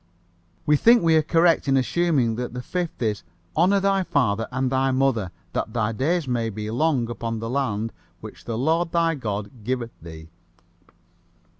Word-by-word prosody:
We 150 -1 +4
think 235 +5 +5
we 165 -1 +4
are 160 - +5
correct 165 0 +3
in 135 0 +3
assuming 135 -3 +1
that 125 +1 -5
the 125 - -5
Fifth 175 -6 -3
is, 105 -2 -1 0.3
"Honor 185 +5 +4
thy 195 0 +2
father 125 - 0
and 130 0 -1
thy 135 0 +2
mother, 130 -7 +1 0.2
that 110 - -2
thy 115 -2 0
days 150 +7 0
may 120 -2 0
be 105 0 -5
long 130 -1 +1
upon 115 0 -4
the 115 +1 -4
land 115 -5 -1 0.3
which 110 +1 -11
the 115 -1 -3
Lord 165 +6 +1
thy 165 -1 +2
God 105 -4 -5
giveth 120 0 -2
thee." 80 -1 -11
130 Hz, 170 wpm, -24 LUFS, 115-160 Hz, 0.3 s, think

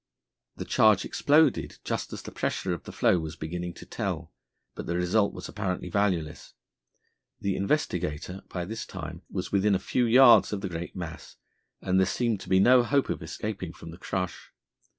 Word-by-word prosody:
The - - -6
charge 110 -3 +4
exploded 150 -1 +2
just - - -3
as - - -7
the - - -8
pressure 95 - -2
of 85 - -7
the - - -7
floe 90 - +3
was 80 -1 -5
beginning 85 +2 -5
to - - -11
tell, 90 -7 -4 0.4
but - - -7
the 85 - -1
result 90 +4 +2
was - - -8
apparently 95 -3 -3
valueless. 90 -7 -1 0.8
The 100 -1 -1
Investigator 90 - -1
by 90 -1 -4
this 110 +4 -6
time 80 +2 -7
was 95 -1 -4
within 100 0 +3
a - - 0
few 125 -2 0
yards 125 +1 +7
of 100 -2 -3
the 95 - -3
great 85 0 -6
mass, 85 -3 -7 0.5
and 95 0 +2
there 95 - +3
seemed 115 -1 0
to - - -10
be 95 - +5
no 125 +5 +6
hope 140 +3 +1
of - - -4
escaping 90 +1 -5
from 80 - -10
the 85 - -12
crush. 90 -2 -4
95 Hz, 185 wpm, -27 LUFS, 85-105 Hz, 0.8 s, yards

